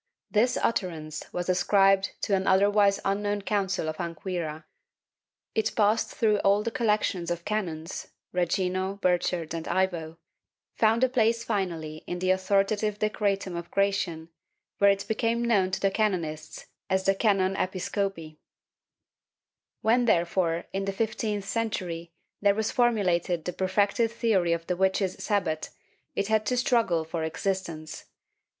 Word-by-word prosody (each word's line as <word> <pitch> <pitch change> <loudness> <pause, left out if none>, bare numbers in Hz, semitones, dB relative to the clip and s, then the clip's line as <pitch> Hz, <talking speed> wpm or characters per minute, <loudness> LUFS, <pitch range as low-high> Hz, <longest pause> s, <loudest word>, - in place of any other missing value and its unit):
This 240 +4 +3
utterance 160 -8 -2
was 175 0 -3
ascribed 195 +1 +3
to 205 - 0
an 190 0 +1
otherwise 200 +1 +4
unknown 205 +1 0
Council 195 -5 -1
of 155 0 -3
Anquira; 170 -2 -4 0.9
it 220 0 0
passed 215 +1 +2
through 215 -2 +1
all 200 +1 +3
the 230 - -2
collections 210 -7 0
of 170 0 -3
canons— 170 -6 -3 0.3
Regino, 185 +2 0
Burchard 175 -3 0
and 165 -1 -4
Ivo 170 -4 -1 0.3
— - - -65
found 225 +2 +4
a - - +6
place 230 -2 +1
finally 170 -8 -2
in 175 - -3
the 185 +1 +1
authoritative 200 +2 +1
Decretum 200 -3 -1
of 170 0 -6
Gratian, 195 -5 0 0.5
where 200 - +6
it 200 0 +1
became 230 +1 0
known 200 -6 +3
to 195 +1 0
canonists 170 -8 -2 0.2
as 190 0 +1
the 195 - +4
canon 195 -2 +2
Episcopi} 185 -4 -3 1.4
When, 240 +3 +3
therefore, 170 -4 +1
in 195 0 -1
the 195 - -2
fifteenth 210 -1 -2
century, 180 -7 -3 0.3
there 200 -1 +4
was 220 0 -1
formulated 180 -8 +1
the 180 - -3
perfected 200 +5 +1
theory 220 -7 +1
of 165 0 -1
the 180 - -1
witches' 190 0 0
Sabbat, 175 -7 -1 0.5
it 200 - 0
had 215 -1 +1
to 250 - +1
struggle 230 -10 +2
for 160 0 -3
existence. 160 -2 -3
195 Hz, 140 wpm, -27 LUFS, 175-210 Hz, 1.4 s, a